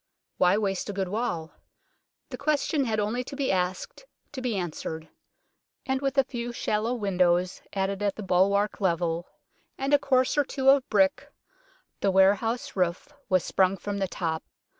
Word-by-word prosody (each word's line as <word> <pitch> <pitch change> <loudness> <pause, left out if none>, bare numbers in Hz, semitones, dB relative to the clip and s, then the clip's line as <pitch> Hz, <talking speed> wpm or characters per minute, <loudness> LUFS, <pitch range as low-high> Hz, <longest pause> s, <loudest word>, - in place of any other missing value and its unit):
Why 180 +2 +4
waste 195 -2 -1
a - - -3
good 190 -2 -2
wall? 180 -7 -2 0.8
The 250 - -5
question 290 0 +1
had 220 -2 0
only 220 +4 -1
to 275 - -8
be 275 -1 0
asked 185 - -2 0.3
to 265 - -6
be 245 -4 -1
answered; 160 -2 -5 0.8
and 265 0 -1
with 275 0 -1
a 270 - +6
few 240 -2 -5
shallow 225 0 -1
windows 180 -4 +1
added 195 0 -1
at 200 -1 0
the 215 - -6
bulwark 200 +3 +2
level 170 -2 0 0.5
and 270 +2 -1
a 290 - +6
course 260 +1 +2
or - - +5
two 270 -1 +1
of 275 -2 +2
brick, 285 0 +2 0.7
the 200 - +1
warehouse 200 +5 +2
roof 180 +9 -1 0.2
was 185 -3 +3
sprung 190 0 +2
from 200 +2 -4
the 195 - 0
top. 160 -3 -3
205 Hz, 165 wpm, -27 LUFS, 185-255 Hz, 0.8 s, a